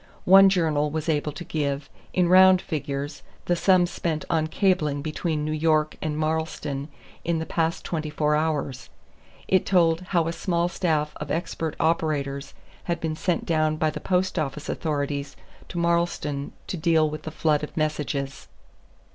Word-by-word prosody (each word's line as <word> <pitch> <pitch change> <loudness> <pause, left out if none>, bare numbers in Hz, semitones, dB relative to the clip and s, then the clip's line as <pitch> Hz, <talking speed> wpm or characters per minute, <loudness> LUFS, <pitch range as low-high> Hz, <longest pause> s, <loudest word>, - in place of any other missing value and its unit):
One 195 +1 +8
journal 155 -5 +1
was 155 +1 -3
able 150 -1 0
to 165 - -7
give, 140 -3 -2 0.2
in 180 -1 +2
round 185 +1 +7
figures, 145 -3 -4 0.2
the 175 - +2
sum 185 0 +4
spent 165 -3 -3
on 160 -1 +2
cabling 155 -6 +1
between 155 0 -2
New 155 - -2
York 155 0 +1
and 150 -1 -2
Marlstone 155 -3 -2 0.4
in 170 0 0
the 160 - -3
past 165 0 -1
twenty 155 -3 -3
four 150 0 +1
hours; 150 -4 -2 0.6
it 190 -1 +3
told 170 -3 +3
how 170 -4 +1
a 165 - -2
small 170 0 0
staff 160 -4 0
of 150 - -6
expert 165 -1 -2
operators 145 -4 -1 0.3
had 170 -1 -1
been 160 -1 -2
sent 175 +2 -1
down 155 -2 +1
by 155 -1 +1
the - - -6
Post 185 -1 0
Office 150 0 -4
authorities 145 -2 -2 0.3
to 175 - -6
Marlstone 170 -4 0
to 185 - -4
deal 160 -1 +3
with 155 0 -5
the 155 - -6
flood 155 -1 +1
of 150 - -7
messages. 150 -3 -2
155 Hz, 165 wpm, -25 LUFS, 150-170 Hz, 0.6 s, One